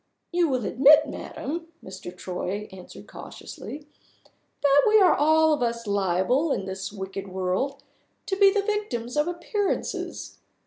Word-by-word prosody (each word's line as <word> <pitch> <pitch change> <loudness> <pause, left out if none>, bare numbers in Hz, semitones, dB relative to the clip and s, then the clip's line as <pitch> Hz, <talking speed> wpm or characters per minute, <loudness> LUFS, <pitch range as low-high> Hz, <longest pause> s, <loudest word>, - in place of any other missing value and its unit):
"You 345 -2 +2
will 255 -5 -1
admit, 290 +8 +6
madam," 325 +4 -6 0.2
Mr. 185 -1 -9
Troy 185 +3 -4
answered 185 -1 -12
cautiously, 290 0 -9 0.8
"that 285 0 +5
we 430 0 +6
are 375 - +6
all 315 +1 +4
of 295 - -1
us 235 -1 -1
liable, 200 - +1
in 195 - -1
this 190 +1 -5
wicked 195 -1 -6
world, 190 +9 -2 0.4
to 385 - -1
be 395 0 +6
the 405 0 0
victims 395 - -3
of 295 +2 +2
appearances. 380 +4 -3
270 Hz, 140 wpm, -25 LUFS, -, 0.8 s, admit